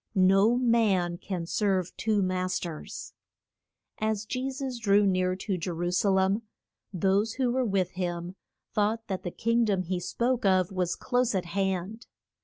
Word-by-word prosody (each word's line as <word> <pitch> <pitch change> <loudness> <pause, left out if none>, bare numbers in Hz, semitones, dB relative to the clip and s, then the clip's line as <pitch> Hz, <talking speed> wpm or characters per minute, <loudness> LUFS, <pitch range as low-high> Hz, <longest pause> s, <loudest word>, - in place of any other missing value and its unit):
No 195 +5 +5
man 210 -8 +2
can 180 -4 -4
serve 185 -1 0
two 215 -2 +1
mas 185 0 0
ters. 165 -3 -7 0.9
As 215 -1 -1
Je 255 +4 -2
sus 265 -2 -4
drew 205 -2 +4
near 185 -1 +1
to 190 -1 -3
Je 165 - -3
ru 175 +1 -2
sa 185 +3 +2
lem 190 +2 +2 0.5
those 195 +3 +1
who 255 -2 0
were 260 +1 +1
with 195 -5 0
him 175 -1 -4 0.4
thought 220 +1 0
that 190 -1 -2
the 180 - -4
king 230 +6 +1
dom 200 -4 +1
he 180 +1 -2
spoke 240 +7 -1
of 185 -1 +3
was 180 -2 -1
close 245 -3 0
at 185 -2 -1
hand. 190 +4 -2
195 Hz, 165 wpm, -28 LUFS, 185-225 Hz, 0.9 s, No